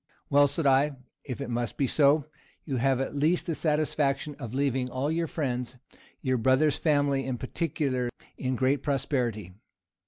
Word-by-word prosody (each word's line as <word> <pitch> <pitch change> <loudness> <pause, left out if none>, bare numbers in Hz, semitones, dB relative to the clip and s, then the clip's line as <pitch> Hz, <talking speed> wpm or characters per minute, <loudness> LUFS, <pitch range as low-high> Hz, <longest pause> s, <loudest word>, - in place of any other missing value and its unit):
"Well," 145 0 +6
said 145 +3 -2
I, 140 +2 +4 0.3
"if 130 -1 -6
it 135 - -4
must 120 -1 -2
be 140 - +2
so, 145 +2 +4 0.4
you 135 -4 -2
have 130 +1 +2
at 135 - -2
least 155 +5 +2
the 165 - -1
satisfaction 150 -2 0
of 120 -6 -6
leaving 130 -2 0
all 135 +4 -1
your 165 +1 0
friends, 125 -5 -3 0.5
your 130 -2 +1
brother's 130 +5 +3
family 145 -3 +2
in 130 -1 -3
particular, 130 -2 -2 0.3
in 130 0 -2
great 130 +3 +1
prosperity." 120 - -1
135 Hz, 160 wpm, -28 LUFS, 130-150 Hz, 0.5 s, Well